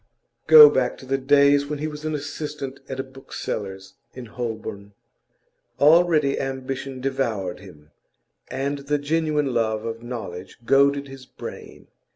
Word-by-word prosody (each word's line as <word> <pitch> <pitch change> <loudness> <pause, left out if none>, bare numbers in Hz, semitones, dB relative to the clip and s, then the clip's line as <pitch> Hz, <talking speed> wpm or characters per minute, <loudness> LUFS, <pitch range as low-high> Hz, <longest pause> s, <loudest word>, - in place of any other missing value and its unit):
Go 155 -1 +11
back 130 -3 0
to - - -12
the 135 +1 -1
days 140 +1 +4
when 150 0 -3
he 150 - -4
was 150 -1 -8
an 155 -1 -1
assistant 145 -1 -6
at 135 -1 -5
a - - -1
bookseller's 100 -7 -7 0.2
in 125 -1 -8
Holborn. 110 -3 -6 0.9
Already 155 -2 +4
ambition 135 0 -5
devoured 120 -9 -2
him, 75 -5 -16 0.6
and 140 +2 -3
the 145 +1 -1
genuine 150 -2 0
love 110 -2 0
of 115 0 -5
knowledge 100 -7 -7
goaded 140 +2 +3
his 135 -1 -12
brain. - - -10
135 Hz, 140 wpm, -23 LUFS, 115-145 Hz, 0.9 s, Go